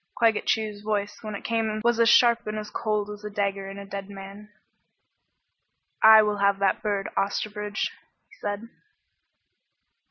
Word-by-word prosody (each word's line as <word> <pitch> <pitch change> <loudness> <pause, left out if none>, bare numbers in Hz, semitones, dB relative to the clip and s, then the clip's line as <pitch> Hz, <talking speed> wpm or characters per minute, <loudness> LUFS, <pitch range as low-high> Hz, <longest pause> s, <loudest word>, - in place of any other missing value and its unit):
Claggett 225 -3 +2
Chew's 215 -2 -1
voice 210 -1 -2
when 215 -2 -6
it - - -8
came 225 -2 -1
was 235 0 +2
as 230 0 +5
sharp 235 -2 +5
and 215 0 -3
as 210 0 -6
cold 210 -2 -2
as 210 0 -10
a 210 - -5
dagger 200 -1 -2
in 195 - -8
a 200 - -8
dead 195 0 -7
man. 200 +1 -10 1.5
"I 220 0 +9
will 210 -1 0
have 200 0 +2
that 195 -1 +1
bird, 200 -2 -1
Osterbridge," 205 +1 -2 0.4
he - - -23
said. 205 +2 -4
210 Hz, 160 wpm, -26 LUFS, 200-215 Hz, 1.5 s, I